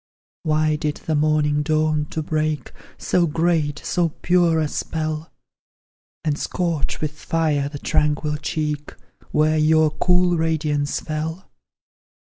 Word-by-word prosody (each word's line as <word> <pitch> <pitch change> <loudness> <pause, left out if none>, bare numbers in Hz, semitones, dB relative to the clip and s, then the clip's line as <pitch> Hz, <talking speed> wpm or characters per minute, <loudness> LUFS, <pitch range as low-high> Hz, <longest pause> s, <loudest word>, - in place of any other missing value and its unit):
Why 155 0 +1
did 150 -1 -2
the 160 - 0
morning 150 -1 +2
dawn 155 0 +1
to 160 - -4
break 155 -3 -1 0.3
So 175 -1 +1
great, 160 -2 +1
so 175 -2 +1
pure, 175 -2 +3
a 155 - +1
spell; 155 +1 -3 0.9
And 150 -2 0
scorch 170 -4 -2
with 155 -1 -1
fire 150 -2 0
the 145 - -7
tranquil 150 +1 0
cheek, 150 -1 -3 0.3
Where 155 +1 +2
your 155 0 +4
cool 180 +1 +2
radiance 155 -3 0
fell? 160 +3 -4
155 Hz, 125 wpm, -22 LUFS, 150-160 Hz, 0.9 s, your